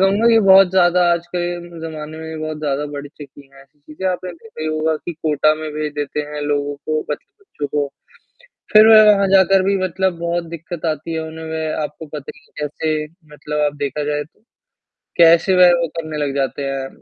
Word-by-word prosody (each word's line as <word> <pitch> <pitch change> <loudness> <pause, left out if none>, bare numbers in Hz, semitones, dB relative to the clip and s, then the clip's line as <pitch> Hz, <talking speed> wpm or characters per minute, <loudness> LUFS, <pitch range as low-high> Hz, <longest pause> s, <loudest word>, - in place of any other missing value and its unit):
कहूँगा 200 +4 +3
कि 230 - +5
बहुत 190 -1 +7
ज़्यादा 180 -1 +3
आजकल 175 +1 -3 0.3
के 170 - -11
ज़माने 155 0 -8
में 160 0 -7
बहुत 155 0 -4
ज़्यादा 145 -1 -2
बढ़ 145 0 -7
चुकी 140 -2 -14
है 135 - -16
ऐसी 140 +2 -29
चीज़ें, 155 +6 -7
आपने 180 0 -3
देखा 175 +2 -14
ही 155 - -2
होगा 155 0 0
कि 175 - -7
कोटा 155 0 +2
में 155 0 -6
भेज 150 0 -3
देते 145 0 -3
हैं 150 - -5
लोगों 145 0 -1
को, 155 +2 -3
मतलब 150 - -4 0.2
बच्चों 150 - -6
को, 145 0 -1 0.9
फिर 215 +1 +8
वह 220 -1 +9
वहाँ 200 -1 +1
जाकर 190 0 +5
भी 195 +1 +1
मतलब 185 -1 -1
बहुत 170 0 -1
दिक्कत 170 0 -7
आती 155 +1 -3
है 160 - -2
उन्हें, 160 0 -8
वे 160 0 -3
आपको 150 +2 -7
पता 145 -2 -6
ही - - -20
है 150 -1 -6
कैसे 155 +1 -2 0.3
मतलब 150 0 -5
आप 145 0 -2
देखा 145 +1 -3
जाए 150 0 -2
तो, 150 - -26 0.8
कैसे 170 +2 +5
वह 180 -1 +7
वो 170 - 0
करने 155 -2 -5
लग 145 -2 -2
जाते 140 0 -2
हैं, 135 -1 -3
155 Hz, 210 wpm, -19 LUFS, 150-175 Hz, 0.9 s, वह